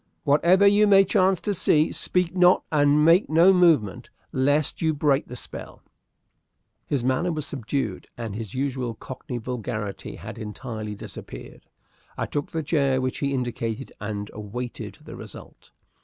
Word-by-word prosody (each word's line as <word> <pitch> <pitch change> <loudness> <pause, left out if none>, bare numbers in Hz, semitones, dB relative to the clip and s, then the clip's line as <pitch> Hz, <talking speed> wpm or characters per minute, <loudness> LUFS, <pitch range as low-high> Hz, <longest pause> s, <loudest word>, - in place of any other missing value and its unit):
Whatever 170 +7 +4
you 205 +1 +5
may 195 -1 +6
chance 190 -1 +2
to 205 - -1
see, 155 -3 +3
speak 180 -1 0
not 180 0 +5
and 150 0 +4
make 170 +4 +5
no 170 +5 +6
movement, 160 - +2 0.2
lest 145 +3 +1
you 160 -2 +1
break 145 -1 +1
the 125 - -8
spell." - - -8 1.0
His 140 -5 -1
manner 130 +8 +1
was 155 -3 -3
subdued, 125 -6 -3
and 115 -3 -5
his 110 -1 -6
usual 130 -3 -2
cockney 125 +2 -7
vulgarity 110 -4 -5
had - - -9
entirely 110 -1 -6
disappeared. - - -10 0.5
I - - -1
took 145 -1 -3
the 160 -1 -3
chair 140 -3 +1
which 130 0 -2
he 140 -1 -1
indicated, 120 -1 -3
and 105 -1 -5
awaited 115 +4 -6
the - - -10
result. - - -12
140 Hz, 150 wpm, -24 LUFS, 115-165 Hz, 1.0 s, may